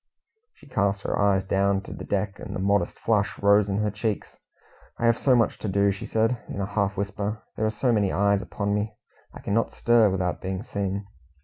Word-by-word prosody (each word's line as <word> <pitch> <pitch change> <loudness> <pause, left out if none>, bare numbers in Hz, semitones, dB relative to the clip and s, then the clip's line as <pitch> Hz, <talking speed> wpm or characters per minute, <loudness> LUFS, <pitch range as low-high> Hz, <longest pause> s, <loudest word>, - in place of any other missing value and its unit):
She - - -19
cast 100 -6 0
her - - -1
eyes 100 -2 +3
down 100 0 +1
to - - -9
the - - -8
deck 100 0 -2
and - - -6
a - - -3
modest 100 +1 +1
flush 105 -3 0
rose 100 0 +4
in 100 - 0
her 105 - 0
cheeks. 105 0 -3 0.6
"I 120 - -1
have 115 0 +3
so 130 -2 +4
much 115 -2 +2
to - - -4
do," 100 +1 +3
she 100 +4 -6
said, 115 +2 +1
in - - -5
a 100 - 0
half 100 0 -1
whisper. 100 +2 -3
"There 110 - 0
are - - +2
so 120 +3 0
many 105 -4 +2
eyes 100 0 +2
upon 100 -1 -2
me, 105 +1 -2 0.4
I - - -11
cannot 115 +3 0
stir 120 -3 +4
without 90 -4 -1
being 95 +1 -3
seen." 100 -4 -3
100 Hz, 215 wpm, -25 LUFS, 100-110 Hz, 0.6 s, rose